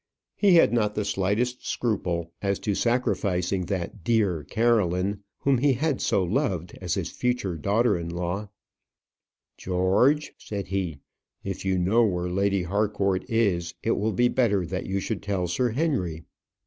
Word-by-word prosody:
He 200 Hz, -4 st, +5 dB
had 165 Hz, -, +5 dB
not 105 Hz, -3 st, +1 dB
the 105 Hz, -, -1 dB
slightest 105 Hz, +6 st, 0 dB
scruple 90 Hz, -7 st, -1 dB
as 100 Hz, -1 st, 0 dB
to 105 Hz, -, 0 dB
sacrificing 100 Hz, -6 st, 0 dB
that 95 Hz, 0 st, -4 dB
"dear 100 Hz, -7 st, +1 dB
Caroline" 100 Hz, 0 st, +1 dB, 0.2 s
whom 135 Hz, -3 st, +3 dB
he 140 Hz, +1 st, +3 dB
had 145 Hz, +2 st, -1 dB
so 95 Hz, -, +2 dB
loved 90 Hz, -, -1 dB
as 90 Hz, -2 st, -1 dB
his 85 Hz, -3 st, -3 dB
future 125 Hz, -8 st, -1 dB
daughter 105 Hz, +6 st, +2 dB
in 85 Hz, -1 st, -4 dB
law. 90 Hz, +4 st, -3 dB, 1.1 s
"George," 95 Hz, +12 st, +2 dB
said 100 Hz, -2 st, -5 dB
he, 90 Hz, -7 st, -2 dB, 0.4 s
"if 95 Hz, -1 st, -5 dB
you 95 Hz, -1 st, +1 dB
know 100 Hz, +7 st, +3 dB
where 90 Hz, -4 st, 0 dB
Lady 100 Hz, 0 st, +1 dB
Harcourt 100 Hz, +1 st, 0 dB
is, 95 Hz, -7 st, +1 dB
it 115 Hz, -, +1 dB
will 110 Hz, +1 st, 0 dB
be 120 Hz, +5 st, +3 dB
better 105 Hz, -7 st, +1 dB
that 90 Hz, +2 st, -4 dB
you 95 Hz, +1 st, -1 dB
should 105 Hz, +2 st, -3 dB
tell 100 Hz, -3 st, -1 dB
Sir 120 Hz, +9 st, 0 dB
Henry. 110 Hz, -, -1 dB
100 Hz, 155 wpm, -26 LUFS, 90-115 Hz, 1.1 s, He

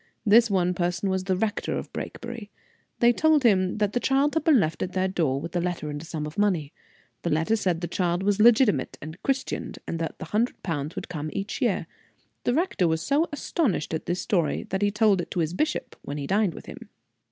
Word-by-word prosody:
This 225 Hz, +2 st, +6 dB
one 180 Hz, -2 st, +2 dB
person 175 Hz, +2 st, -1 dB
was 190 Hz, 0 st, -1 dB
the 190 Hz, -1 st, +1 dB
Rector 210 Hz, +1 st, -1 dB
of -, -, -7 dB
Brakebury. 235 Hz, -3 st, -6 dB, 0.5 s
They 240 Hz, 0 st, +6 dB
told 310 Hz, +1 st, +3 dB
him 185 Hz, -5 st, +3 dB
that 210 Hz, -1 st, 0 dB
the 245 Hz, -, +1 dB
child 275 Hz, +3 st, +2 dB
had 320 Hz, -, 0 dB
been 310 Hz, -6 st, +5 dB
left 160 Hz, -4 st, -1 dB
at 185 Hz, -, -2 dB
their 185 Hz, 0 st, +1 dB
door, 160 Hz, -8 st, 0 dB
with 165 Hz, +4 st, -7 dB
a 175 Hz, -, +2 dB
letter 170 Hz, -4 st, -3 dB
and 145 Hz, 0 st, -5 dB
a -, -, -9 dB
sum 155 Hz, -2 st, -4 dB
of 150 Hz, +5 st, -6 dB
money. 175 Hz, -8 st, +1 dB, 0.5 s
The 170 Hz, -, -2 dB
letter 160 Hz, +8 st, +2 dB
said 180 Hz, -6 st, 0 dB
the 175 Hz, -, -2 dB
child 175 Hz, 0 st, 0 dB
was 205 Hz, +1 st, +1 dB
legitimate 225 Hz, -, +4 dB
and 155 Hz, +3 st, -9 dB
christened, 270 Hz, -1 st, -2 dB
and 165 Hz, -, -3 dB
that 165 Hz, -, -3 dB
the -, -, -7 dB
hundred 215 Hz, +8 st, -1 dB
pounds 155 Hz, -3 st, -3 dB
would -, -, -5 dB
come 155 Hz, -3 st, -4 dB
each 195 Hz, +1 st, -4 dB
year. -, -, +1 dB, 0.6 s
The 245 Hz, -, +2 dB
rector 320 Hz, -, +1 dB
was 160 Hz, 0 st, 0 dB
so 295 Hz, +4 st, +1 dB
astonished 285 Hz, -, -1 dB
at 160 Hz, -, -3 dB
this 175 Hz, +1 st, -1 dB
story 170 Hz, -7 st, 0 dB
that 190 Hz, +1 st, -1 dB
he 205 Hz, -, +3 dB
told 210 Hz, -3 st, +3 dB
it -, -, -8 dB
to 180 Hz, -, -3 dB
his 165 Hz, 0 st, 0 dB
bishop 305 Hz, +11 st, -2 dB
when 145 Hz, -, -6 dB
he 140 Hz, -, -4 dB
dined 200 Hz, 0 st, +1 dB
with -, -, -10 dB
him. -, -, -10 dB
185 Hz, 230 wpm, -26 LUFS, 165-225 Hz, 0.6 s, This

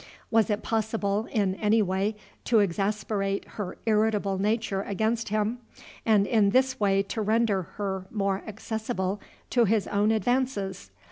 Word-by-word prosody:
Was 225 Hz, -2 st, +3 dB
it 210 Hz, 0 st, -1 dB
possible, 220 Hz, -1 st, -1 dB
in 200 Hz, -4 st, +1 dB
any 210 Hz, +3 st, +2 dB
way, 195 Hz, +3 st, 0 dB, 0.3 s
to 235 Hz, -, +3 dB
exasperate 200 Hz, +1 st, 0 dB
her 205 Hz, -4 st, -6 dB
irritable 210 Hz, -3 st, +1 dB
nature 210 Hz, -1 st, 0 dB
against 220 Hz, +3 st, -1 dB
him, 215 Hz, +3 st, 0 dB, 0.5 s
and 210 Hz, -3 st, +5 dB
in 210 Hz, -2 st, +3 dB
this 260 Hz, +4 st, +2 dB
way 195 Hz, -1 st, +3 dB
to 220 Hz, +3 st, -4 dB
render 215 Hz, -2 st, +2 dB, 0.2 s
her 190 Hz, -2 st, -3 dB
more 195 Hz, -2 st, -1 dB
accessible 215 Hz, -2 st, -3 dB, 0.3 s
to 240 Hz, -2 st, +4 dB
his 215 Hz, 0 st, +2 dB
own 205 Hz, +1 st, +1 dB
advances? 220 Hz, -, 0 dB
210 Hz, 140 wpm, -27 LUFS, 195-220 Hz, 0.5 s, and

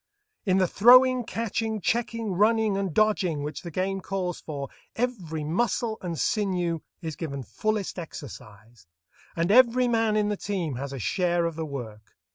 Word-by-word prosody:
In 185 Hz, 0 st, +4 dB
the 190 Hz, -, +4 dB
throwing, 255 Hz, +5 st, +6 dB
catching, 225 Hz, -1 st, -2 dB
checking, 230 Hz, +1 st, -1 dB
running, 215 Hz, +2 st, +3 dB
and 195 Hz, -2 st, -1 dB
dodging 180 Hz, -5 st, +1 dB
which 150 Hz, 0 st, -5 dB
the 175 Hz, -, -7 dB
game 190 Hz, +3 st, -2 dB
calls 185 Hz, -3 st, -3 dB
for, 140 Hz, -3 st, -5 dB, 0.3 s
every 185 Hz, -11 st, -2 dB
muscle 220 Hz, +6 st, -1 dB
and 170 Hz, -3 st, -4 dB
sinew 180 Hz, -7 st, 0 dB, 0.2 s
is 160 Hz, -2 st, -4 dB
given 140 Hz, -4 st, -5 dB
fullest 215 Hz, -, -2 dB
exercise, 110 Hz, -, -11 dB, 0.5 s
and 170 Hz, +3 st, +1 dB
every 250 Hz, +1 st, +5 dB
man 225 Hz, -2 st, +2 dB
in 210 Hz, -1 st, +1 dB
the 210 Hz, -, -1 dB
team 185 Hz, -8 st, -3 dB
has 140 Hz, +1 st, -5 dB
a 135 Hz, -, -5 dB
share 175 Hz, -, +1 dB
of 165 Hz, -1 st, -2 dB
the 160 Hz, -1 st, -4 dB
work. 110 Hz, -7 st, -8 dB
185 Hz, 160 wpm, -26 LUFS, 155-220 Hz, 0.5 s, throwing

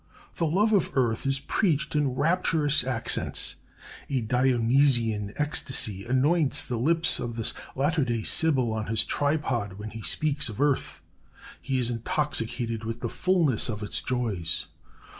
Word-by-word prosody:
The 165 Hz, -, +1 dB
love 205 Hz, +8 st, +2 dB
of 180 Hz, -8 st, +1 dB
earth 120 Hz, 0 st, +1 dB
is 135 Hz, 0 st, +2 dB
preached 150 Hz, +1 st, 0 dB
in 140 Hz, -4 st, +1 dB
rapturous 155 Hz, -3 st, +2 dB
accents. 125 Hz, -3 st, -1 dB, 0.5 s
A 135 Hz, -3 st, 0 dB
Dionysian 120 Hz, -2 st, +2 dB
ecstasy 130 Hz, -9 st, 0 dB
anoints 140 Hz, +5 st, +2 dB
the 120 Hz, -, -4 dB
lips 165 Hz, +6 st, +1 dB
of 120 Hz, -1 st, -4 dB
this 115 Hz, -2 st, -1 dB, 0.2 s
latter 145 Hz, +3 st, +1 dB
day 120 Hz, -3 st, -2 dB
Sibyl 130 Hz, -7 st, +2 dB
on 110 Hz, -1 st, -3 dB
his 110 Hz, 0 st, +2 dB
tripod 140 Hz, -9 st, -1 dB
when 105 Hz, +2 st, -8 dB
he 110 Hz, -, -8 dB
speaks 150 Hz, +4 st, 0 dB
of 110 Hz, -, -8 dB
earth. 145 Hz, -1 st, 0 dB, 0.6 s
He 135 Hz, -, -2 dB
is 125 Hz, -1 st, 0 dB
intoxicated 115 Hz, -2 st, -1 dB
with 115 Hz, +1 st, -5 dB
the -, -, -2 dB
fulness 165 Hz, -, +1 dB
of 105 Hz, -2 st, -4 dB
its 105 Hz, -, 0 dB
joys. 105 Hz, -10 st, -1 dB
130 Hz, 145 wpm, -26 LUFS, 115-150 Hz, 0.6 s, love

